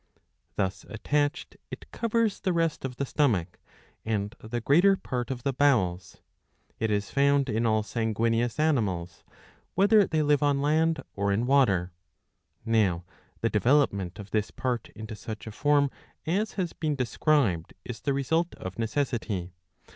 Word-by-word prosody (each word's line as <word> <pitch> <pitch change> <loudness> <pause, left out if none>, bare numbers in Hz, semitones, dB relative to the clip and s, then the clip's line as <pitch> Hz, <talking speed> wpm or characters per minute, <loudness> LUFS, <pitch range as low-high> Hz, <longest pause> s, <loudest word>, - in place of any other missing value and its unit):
Thus 95 -1 -2
attached, 145 +6 -1
it - - -10
covers 230 -2 0
the 185 -3 0
rest 165 -2 0
of 130 -2 -4
the 140 - -2
stomach 105 - 0 0.4
and 105 -1 -2
the 115 +2 -4
greater 175 - +4
part 125 -7 -4
of 125 -2 -4
the 140 - 0
bowels. 95 - +1 0.6
It 110 - 0
is 105 -1 -1
found 140 0 +3
in 115 +1 +1
all 110 -1 +2
sanguineous 115 +2 0
animals 95 - 0 0.5
whether 205 +1 +5
they 155 -1 +1
live 145 -1 +3
on 145 -1 +2
land 160 +3 +1
.or 100 0 0
in 110 +5 +1
water.^ 100 -10 +3 0.7
Now 100 -7 +1 0.4
the 115 - +2
development 105 -6 +2
of 105 -1 -10
this 110 -1 0
part 125 -3 -3
into 110 0 -7
such 110 +1 -7
a 110 - -6
form 145 +4 +2 0.3
as 200 +7 0
has 180 -4 -2
been 155 -2 -2
described 125 - +1
is 115 -3 -7
the 140 - 0
result 160 +5 0
of 95 +4 -8
necessity. 115 -7 -2
120 Hz, 150 wpm, -27 LUFS, 105-145 Hz, 0.7 s, whether